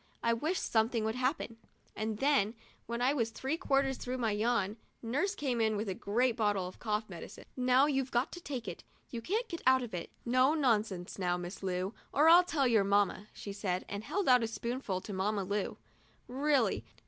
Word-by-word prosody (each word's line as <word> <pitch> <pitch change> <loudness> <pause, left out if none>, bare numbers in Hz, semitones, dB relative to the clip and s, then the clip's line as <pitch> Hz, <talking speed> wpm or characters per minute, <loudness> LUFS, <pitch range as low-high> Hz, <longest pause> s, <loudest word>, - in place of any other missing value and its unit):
I 230 - +3
wish 310 +10 -1
something 225 0 +1
would 220 - 0
happen;' 255 -1 -1 0.4
and 215 0 -2
then, 255 -5 +2 0.3
when 235 +1 -2
I 265 +3 +4
was 230 -6 0
three 265 +6 -2
quarters 275 -5 +1
through 250 +1 -4
with 255 - -4
my 225 -2 +1
yawn, 215 -1 0 0.3
nurse 295 - 0
came 255 -5 -1
in 220 -1 +2
with 210 +1 -3
a 190 - -1
great 230 +6 +1
bottle 205 -5 +1
of 185 - -11
cough 215 -1 -1
medicine. 175 -4 -10
" - - -38 0.2
Now 260 +3 +7
you've 270 -3 0
got 245 +4 0
to 350 - -8
take 260 -8 -5
it; 175 - -6 0.3
you 235 - -4
can't 435 - -1
get 335 -5 -6
out 260 -1 +5
of 235 - -7
it. 175 -2 -4 0.2
No 255 +5 +4
nonsense 215 - 0
now, 180 -1 +1
Miss 175 +2 -7
Lu, 185 +1 -2 0.2
or 300 +3 +4
I'll 345 +2 +9
tell 320 -6 0
your 225 -4 +4
mamma," 200 0 +1
she 200 - -7
said, 190 -3 -2
and 200 +1 -5
held 370 - -2
out 250 -2 +6
a 230 - 0
spoonful 230 -4 -3
to 205 - -7
Mamma 200 +1 0
Lu. 200 +1 -2
230 Hz, 205 wpm, -32 LUFS, 205-265 Hz, 0.4 s, I'll